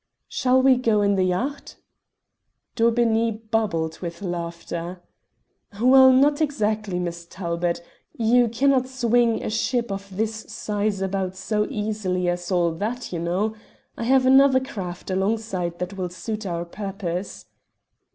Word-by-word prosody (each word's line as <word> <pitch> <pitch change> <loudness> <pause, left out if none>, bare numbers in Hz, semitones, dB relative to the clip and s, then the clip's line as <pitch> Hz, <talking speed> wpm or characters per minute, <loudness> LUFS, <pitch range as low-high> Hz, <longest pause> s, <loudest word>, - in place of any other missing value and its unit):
"Shall 260 0 +2
we 260 -1 +6
go 225 -4 +2
in 200 0 +3
the 190 -1 +2
yacht?" 245 +11 -2 1.0
Daubeney 230 -1 +2 0.2
bubbled 165 -8 0
with 170 +1 -6
laughter. 170 0 -5 0.8
"Well, 260 +2 +7
not 285 +4 +4
exactly, 215 -9 0
Miss 170 -1 -4
Talbot. 170 -1 -2 0.3
You 240 +1 +4
cannot 255 +3 +2
swing 240 -3 +1
a - - -3
ship 235 +1 0
of 195 -1 -6
this 220 0 -1
size 205 -2 -2
about 190 -1 -2
so 210 +3 -1
easily 205 -4 -2
as 175 +1 -3
all 175 -2 +2
that, 215 +7 -4
you 170 - -2
know. 185 +6 -1 0.4
I 230 - -4
have 260 +1 +4
another 265 0 +6
craft 190 -9 -6
alongside 190 -3 -1
that 180 +2 -4
will 185 -2 -3
suit 210 +4 -5
our 170 -1 -3
purpose." 185 - -5
210 Hz, 135 wpm, -24 LUFS, 180-235 Hz, 1.0 s, Well